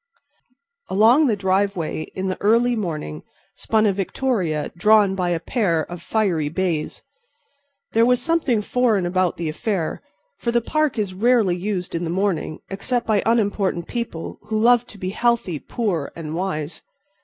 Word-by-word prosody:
Along 230 +10 +5
the 225 - +2
driveway 190 -4 0
in 190 0 -2
the 185 - -3
early 235 +4 +3
morning 155 - -4 0.3
spun 220 -1 +1
a 205 - +3
victoria 190 - -1
drawn 210 +2 +4
by 180 -2 -1
a 170 -1 0
pair 175 -6 0
of 175 +1 -8
fiery 175 -8 0
bays. 165 -2 -2 0.9
There 225 - +4
was 250 +1 +4
something 255 -6 +1
foreign 235 -6 +1
about 185 0 0
the 170 - -3
affair, 165 +2 -2 0.4
for 235 - -1
the 240 - +3
Park 305 +4 0
is 205 -3 -1
rarely 220 -2 +3
used 180 -1 -3
in 170 - -2
the 165 - -2
morning 180 -4 -1
except 235 +5 -2
by 215 -3 +2
unimportant 200 -6 +1
people 235 -9 -5
who 215 0 -1
love 240 +1 +4
to 210 - -12
be 185 -1 -3
healthy, 230 -8 0
poor 190 - -2
and 160 -2 -6
wise. 165 -3 -3
195 Hz, 155 wpm, -22 LUFS, 175-230 Hz, 0.9 s, Along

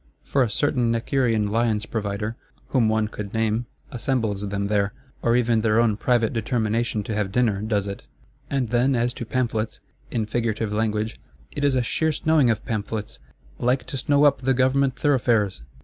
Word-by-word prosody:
For 140 - +1
a 120 - +2
certain 120 0 +1
_Necker_ean 115 -3 +1
Lion's 110 -1 +1
provider, 105 0 -3 0.3
whom 120 -5 +3
one 110 0 +1
could 105 -1 -7
name, 110 +1 0 0.2
assembles 110 -5 -1
them 100 0 -2
there;—or 105 +4 -1
even 120 -2 +2
their 110 0 +3
own 115 -3 +3
private 115 0 +1
determination 115 -1 0
to 110 - -4
have 105 -2 -1
dinner 110 -4 +1
does 105 -2 0
it. 100 -1 -5 0.5
And 135 -5 -1
then 125 +3 +2
as 120 +1 +1
to 120 - -7
Pamphlets—in 110 -2 -3
figurative 110 -1 -1
language; 110 0 -1 0.3
"it 145 - -4
is 140 -2 +3
a 125 - +2
sheer 160 +7 +1
snowing 155 -4 +3
of 110 -3 -1
pamphlets; 110 -1 -4 0.4
like 125 +2 +1
to - - -6
snow 145 +2 +2
up 145 -2 +4
the 130 0 +2
Government 130 +1 +2
thoroughfares!" 120 - +2
115 Hz, 165 wpm, -24 LUFS, 105-125 Hz, 0.5 s, up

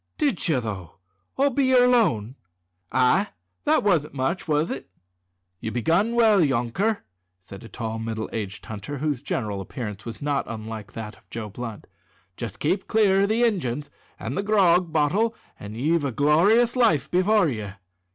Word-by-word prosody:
"Did 280 - 0
ye, 145 -5 +3
though, 100 -7 -6 0.4
all 280 +1 +3
be 270 +2 +1
yer 255 -1 +5
lone?" 130 - +2 0.6
"Ay; 130 +11 +3 0.4
that - - +3
wasn't 165 -8 +1
much, 140 +8 -1
was 150 +1 +1
it?" 135 - -6 0.7
"You've 110 0 -5
begun 170 - +2
well, 220 -4 +5
yonker," 145 - 0 0.4
said 100 +4 -12
a 115 - -11
tall, 115 -2 -4
middle 110 -1 -3
aged 105 -3 -5
hunter, 110 +7 -6
whose 145 -2 -1
general 105 -8 -3
appearance 105 0 -6
was 115 - -7
not 145 -1 -1
unlike 110 -2 -7
that 110 -1 -7
of - - -27
Joe 110 -2 -5
Blunt. 115 +1 -7 0.5
"Jest 115 -1 -6
keep 185 +6 0
clear 200 -3 +3
o' - - +4
the 225 +3 +2
Injuns 150 - -1 0.3
an' 115 - -4
the 195 - -1
grog 185 -5 +3
bottle, 180 +10 +1 0.2
an' 105 +1 -8
ye've 155 +6 +1
a 140 - -1
glor'ous 190 - +4
life 230 - +2
before 190 +1 +3
ye." 105 -7 -4
145 Hz, 165 wpm, -24 LUFS, -, 0.7 s, yer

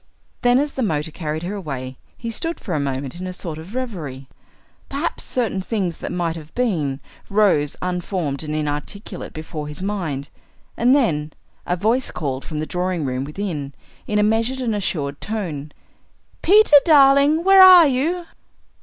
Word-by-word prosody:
Then 245 0 +4
as 290 +2 0
the 265 - -3
motor 160 -7 -1
carried 155 0 -4
her 185 +4 -3
away 135 -9 -5 0.2
he 230 -1 -5
stood 330 +8 -3
for 185 - -5
a 155 - 0
moment 135 +2 -3
in 185 - -5
a 185 - -5
sort 165 -3 -6
of 180 +8 -10
reverie. 160 - -5 0.6
Perhaps 285 +5 -2
certain 225 -6 -1
things 190 -5 -2
that - - -5
might 170 -2 -1
have 155 -1 -10
been 160 - 0 0.3
rose 195 -8 +2
unformed 180 -5 -2
and 155 -1 -4
inarticulate 155 +7 -4
before 155 -1 -6
his 150 - -6
mind. 170 -9 -3 0.5
And 245 +3 +4
then, 155 - 0 0.3
a 180 - +1
voice 225 +8 +1
called 135 -4 -4
from 155 - -6
the 155 - -2
drawing 180 -2 -2
room 130 0 -2
within, 150 -4 -5 0.3
in 210 - 0
a 210 - +4
measured 225 +5 +1
and 240 -4 -1
assured 145 -8 -2
tone, 165 -9 -4 0.7
"Peter, 400 -5 +7
darling, 285 +1 +5
where 385 +1 +7
are 365 -3 +10
you?" 310 +6 0
180 Hz, 165 wpm, -21 LUFS, 150-245 Hz, 0.7 s, are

